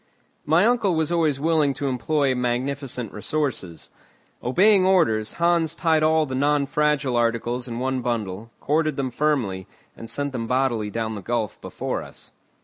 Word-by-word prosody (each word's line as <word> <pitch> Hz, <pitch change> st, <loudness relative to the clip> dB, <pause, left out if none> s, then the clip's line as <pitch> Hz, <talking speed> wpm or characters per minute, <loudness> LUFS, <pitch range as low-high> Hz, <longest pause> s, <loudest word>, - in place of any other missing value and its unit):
My 160 Hz, +6 st, +4 dB
uncle 225 Hz, -6 st, +2 dB
was 160 Hz, 0 st, 0 dB
always 160 Hz, -5 st, +1 dB
willing 150 Hz, -3 st, +2 dB
to 140 Hz, -, -3 dB
employ 135 Hz, +2 st, +1 dB
magnificent 125 Hz, -1 st, -2 dB
resources. 105 Hz, -, -3 dB, 0.5 s
Obeying 190 Hz, -, +4 dB
orders, 155 Hz, -, +2 dB
Hans 170 Hz, -2 st, +1 dB
tied 160 Hz, -2 st, +2 dB
all 155 Hz, 0 st, +3 dB
the 130 Hz, -, -6 dB
non 145 Hz, +2 st, +2 dB
fragile 150 Hz, -3 st, 0 dB
articles 120 Hz, +1 st, 0 dB
in 115 Hz, -1 st, -5 dB
one 130 Hz, +1 st, -1 dB
bundle, 115 Hz, -3 st, -3 dB
corded 155 Hz, +1 st, 0 dB
them 130 Hz, -2 st, -2 dB
firmly, 120 Hz, -11 st, -1 dB, 0.3 s
and 115 Hz, -, -10 dB
sent 145 Hz, +4 st, -2 dB
them 115 Hz, -3 st, -4 dB
bodily 125 Hz, -4 st, 0 dB
down 110 Hz, +1 st, -3 dB
the 100 Hz, -, -6 dB
gulf 115 Hz, 0 st, -3 dB
before -, -, -4 dB
us. -, -, -13 dB
135 Hz, 155 wpm, -23 LUFS, 120-155 Hz, 0.5 s, My